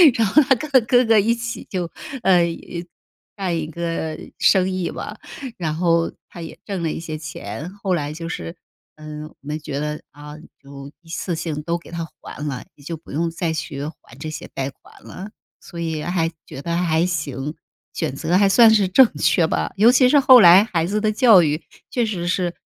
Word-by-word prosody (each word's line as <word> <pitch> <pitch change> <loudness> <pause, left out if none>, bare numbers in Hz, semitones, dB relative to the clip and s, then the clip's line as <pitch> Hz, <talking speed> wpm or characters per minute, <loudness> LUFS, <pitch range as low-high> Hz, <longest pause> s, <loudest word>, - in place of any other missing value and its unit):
然 225 -3 +2
后 295 +10 +5
他 265 -2 +3
跟 295 +5 -7 0.2
哥 245 -1 +4
哥 225 -1 +5
一 225 +4 +2
起 235 0 -6
就 180 -4 -2 0.4
呃 180 -3 +5
一， 170 +1 -5 0.5
干 185 -4 -2
1 155 -1 -3
个 165 -1 -4 0.2
生 190 -2 +4
意 185 -2 -2
吧， - - -7 0.4
然 155 -4 -2
后 165 0 +1 0.2
他 175 - -10
也 165 - -9
挣 195 -4 -4
了 160 - -1
一 - - -5
些 160 -2 -6
钱。 150 - -7
后 195 -2 -2
来 150 -3 -1
就 165 +2 -6
是 85 - -6 0.4
嗯 155 0 -8
我 - - -19
们 150 +2 -5
觉 145 -2 -5
得 150 0 -3
啊， 150 +1 -11 0.2
就 140 0 -11
一 165 - -20
次 170 +1 -3
性 155 -2 -4
都 170 +2 -2
给 170 - -15
它 170 -1 -4 0.2
还 150 - -8
了， 135 -3 -4
你 145 - -20
就 165 +3 -5
不 160 - -15
用 165 +4 -1
再 165 0 -2
去 145 -3 -5 0.2
还 120 - -17
这 155 - -5
些 155 - -8
贷 135 0 -2
款 - - -21
了， 190 +3 -9 0.3
所 170 - -10
以 160 -2 -3
还 170 -2 0 0.2
觉 135 - -8
得 170 0 -2
还 170 -1 +1
行， 150 -5 -3 0.4
选 155 -5 -3
择 165 +5 -1
还 200 -1 +4
算 225 +2 +7
是 200 -3 +3
正 240 +6 +5
确 175 - +3
吧。 - - -1
尤 220 +4 +6
其 250 0 +5
是 290 - +5
后 260 -3 +8
来 180 +2 +9
孩 175 -7 -1
子 210 +2 0
的 215 0 +2
教 215 -5 +6
育 150 +1 -1 0.3
确 245 - +1
实 175 -5 -3
是， 180 -1 -1
170 Hz, 220 characters per minute, -21 LUFS, 155-195 Hz, 0.5 s, 来